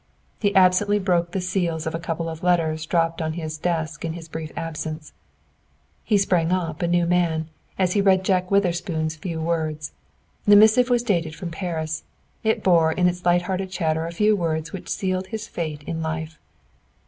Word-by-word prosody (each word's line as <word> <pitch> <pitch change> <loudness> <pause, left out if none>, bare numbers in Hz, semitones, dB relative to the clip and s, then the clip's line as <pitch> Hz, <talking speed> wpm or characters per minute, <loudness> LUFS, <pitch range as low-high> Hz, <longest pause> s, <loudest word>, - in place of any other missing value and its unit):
He 205 -2 +1
absently 190 +2 +4
broke 175 -3 +1
the 190 - -2
seals 180 -3 -1
of 160 - -2
a 165 - -2
couple 165 0 -3
of 160 0 -6
letters 160 -3 +1
dropped 165 -1 +1
on 160 0 -1
his 160 -1 -4
desk 160 -3 -2
in 165 -1 -2
his 165 -1 -9
brief 160 -1 -6
absence. 160 -1 -5 0.9
He 210 - +2
sprang 180 -4 +2
up, 165 -4 -1
a 175 - +1
new 175 0 +2
man, 170 -2 +1 0.3
as 185 -2 +2
he 205 - +3
read 190 -1 +3
Jack 185 -1 +1
Witherspoon's 175 -5 0
few 165 +1 -5
words. 160 -2 -2 0.6
The 205 - +8
missive 220 +4 +6
was 240 -1 +2
dated 170 -8 0
from 170 0 -6
Paris. 160 -3 -3 0.4
It 220 0 +1
bore 165 -3 +4
in 180 +2 +2
its 180 0 -2
light 175 0 +4
hearted 190 0 -2
chatter 165 -3 -1
a - - -5
few 210 +5 +3
words 165 -3 -2
which 190 - -7
sealed 185 -1 -1
his 220 +1 -5
fate 155 -3 -5
in 165 +1 -4
life. 160 0 -4
170 Hz, 185 wpm, -23 LUFS, 160-185 Hz, 0.9 s, The